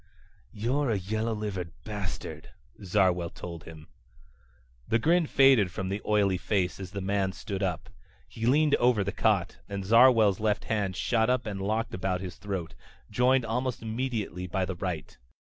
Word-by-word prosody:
"You're 125 +6 -1
a 110 - +1
yellow 110 +4 -2
livered 95 -5 -4
bastard," 105 -4 -6 0.3
Zarwell 90 -3 +2
told 85 -2 -8
him. 80 -1 -11 1.0
The 115 - +3
grin 165 +7 +2
faded 135 -10 +5
from 95 +2 -4
the 100 +2 -3
oily 100 -3 +2
face 95 -4 -1
as 95 -2 -6
the 100 +2 -5
man 95 0 0
stood 100 -1 -5
up. 90 -2 -2 0.4
He 115 +1 -4
leaned 150 +3 +4
over 120 -4 +3
the 100 - -2
cot 100 -5 +1
and 100 -1 -4
Zarwell's 115 -2 +6
left 105 -1 0
hand 100 -4 -1
shot 110 +4 +1
up 125 -1 +1
and 100 -3 -4
locked 110 +3 -1
about 90 0 -1
his 95 -1 -7
throat, 95 -4 -5 0.4
joined 125 +3 +3
almost 125 +1 -2
immediately 110 -6 -3
by 95 +1 -1
the 95 - -4
right. 85 -4 -4
100 Hz, 165 wpm, -28 LUFS, 95-115 Hz, 1.0 s, Zarwell's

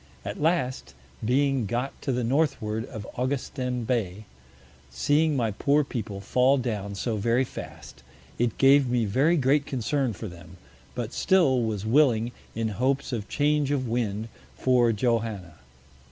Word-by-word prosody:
At - - -5
last, 130 - 0 0.3
being 135 0 +1
got 120 +6 -3
to 135 - -1
the 125 -1 -1
Northward 115 -4 0
of 110 -6 -7
Augustin 125 -1 -2
Bay, 110 -4 -2 0.6
seeing 145 - +2
my 115 -3 0
poor 145 +8 +2
People 110 -7 -5
fall 125 +6 +3
down 105 -5 -3
so 110 +2 -2
very 115 +5 +2
fast, - - -9 0.4
it 120 -2 0
gave 135 -1 +5
me 120 -2 +1
very 140 - +2
great 140 +1 +2
Concern 130 0 -1
for 110 +3 -7
them, 85 -1 -12 0.4
but 120 0 -4
still 165 -10 +3
was 110 -3 -2
willing, 120 -2 +3 0.2
in 115 0 -1
Hopes 130 +6 -1
of 110 -3 -4
Change 150 -1 +1
of 135 -3 0
Wind, 115 -2 -2 0.3
for 125 -2 +3
Johanna. 110 -7 -1
120 Hz, 145 wpm, -26 LUFS, 110-135 Hz, 0.6 s, gave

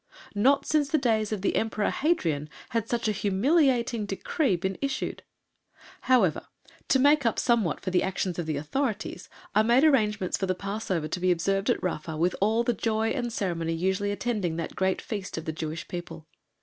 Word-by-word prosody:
Not 255 +7 +3
since 300 -2 +1
the 310 - +3
days 220 -6 +1
of 205 -3 -3
the - - +1
Emperor 220 -2 0
Hadrian 165 - 0 0.2
had 230 -1 -2
such 235 -2 0
a - - +2
humiliating 235 - +2
decree 200 - 0
been 190 +2 -3
issued. 275 -1 -2 0.9
However, 220 -11 +3 0.4
to - - +4
make 290 +2 +4
up 230 -2 +1
somewhat 230 - +1
for 185 - -3
the 180 - +3
action 190 -1 -1
of 170 - -3
the 155 -2 -1
authorities, 220 - -3 0.2
I 215 - +5
made 240 +5 +4
arrangements 210 - +2
for 190 - -2
the 185 - 0
Passover 195 -4 -3
to 180 - -3
be 185 +1 +1
observed 195 +5 +1
at 245 - +1
Rafa 160 -3 -3
with 175 +3 +1
all 220 +3 +3
the 240 - +1
joy 220 0 0
and 240 -2 -2
ceremony 170 -6 -2
usually 190 +4 0
attending 205 -5 -1
that 165 0 -4
great 190 0 0
Feast 200 -6 -5
of 160 - -5
the 160 - -3
Jewish 155 +1 -5
People. 175 -3 -7
205 Hz, 190 wpm, -27 LUFS, 180-240 Hz, 0.9 s, I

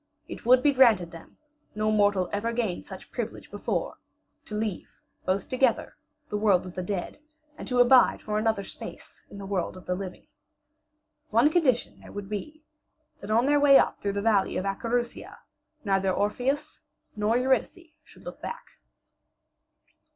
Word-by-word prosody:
It - - -9
would 250 +1 +6
be 290 - +4
granted 225 -10 +4
them 165 - -13 0.4
no 215 0 +1
mortal 205 -3 +2
ever 215 +3 -1
gained 225 -7 -2
such - - -11
privilege - - -6
before - - -3 0.5
to 210 - -6
leave, 210 -3 -4 0.3
both 190 +1 0
together, 260 +1 +1 0.3
the 210 - -3
world 200 -4 +3
of 180 - -8
the 185 - -4
dead, 185 +5 -4 0.4
and - - -9
to 250 - -1
abide 245 +1 +6
for 210 0 -1
another 220 -2 0
space - - -11
in - - -11
the 200 - -7
world 190 -2 -2
of 185 - -13
the 180 - -1
living. 185 0 -7 1.0
One 235 +8 +4
condition 285 -8 +1
there - - -13
would 205 -1 -7
be 300 +10 -6 0.6
that 200 - -9
on 230 +3 +3
their 290 +1 +3
way 280 -1 +7
up - - +1
through 200 -1 -1
the 200 0 -2
valley 210 -3 +2
of 185 - -2
Acherusia 235 +4 -3 0.5
neither 195 -1 +1
Orpheus 245 +9 -1 0.3
nor 215 +2 +1
Eurydice 265 +6 -1
should - - -18
look - - -9
back. 480 - -8
215 Hz, 165 wpm, -27 LUFS, 195-250 Hz, 1.0 s, way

